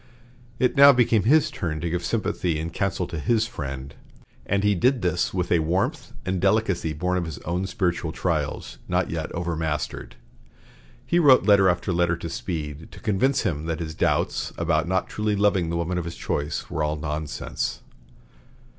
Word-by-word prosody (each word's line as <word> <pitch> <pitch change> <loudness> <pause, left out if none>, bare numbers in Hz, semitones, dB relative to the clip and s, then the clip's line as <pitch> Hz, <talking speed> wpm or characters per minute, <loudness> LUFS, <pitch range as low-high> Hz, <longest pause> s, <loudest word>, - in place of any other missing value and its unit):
It 125 +3 +1
now 140 0 +9
became 115 -5 +3
his 155 +4 +4
turn 80 - -3
to 85 - -2
give 90 0 -2
sympathy 90 -6 -1
and 85 +2 -4
counsel 95 -2 -1
to 85 -2 -5
his 110 +8 +2
friend, 70 - -6 0.5
and 100 0 +1
he 105 0 +4
did 125 +6 +2
this 90 -1 +1
with 90 -2 -2
a 85 - +4
warmth 85 +5 -1
and 95 -1 -1
delicacy 95 -4 +1
born 90 +4 -1
of 90 - -1
his 80 -4 -6
own 90 +3 -1
spiritual 90 -6 -1
trials, 80 -4 -2
not - - 0
yet - - -2
entirely 85 - -5
overmastered. 80 -7 -3 0.9
He 175 - +2
wrote 140 -6 +6
letter 100 -2 +5
after 90 +1 0
letter 85 -1 +1
to 85 -1 -6
Speed 75 -3 -5
to - - -11
convince 120 +6 +1
him 80 -7 -2
that 80 -1 -2
his 80 -2 -4
doubts - - 0
about 80 -1 +1
not 95 +1 0
truly 105 -1 -1
loving 100 -4 +2
the 85 - -1
woman 85 +2 -1
of 85 - -4
his 85 - -6
choice 75 +1 -3
were 80 - -2
all 75 0 0
nonsense. 75 0 -4
90 Hz, 180 wpm, -24 LUFS, 80-100 Hz, 0.9 s, now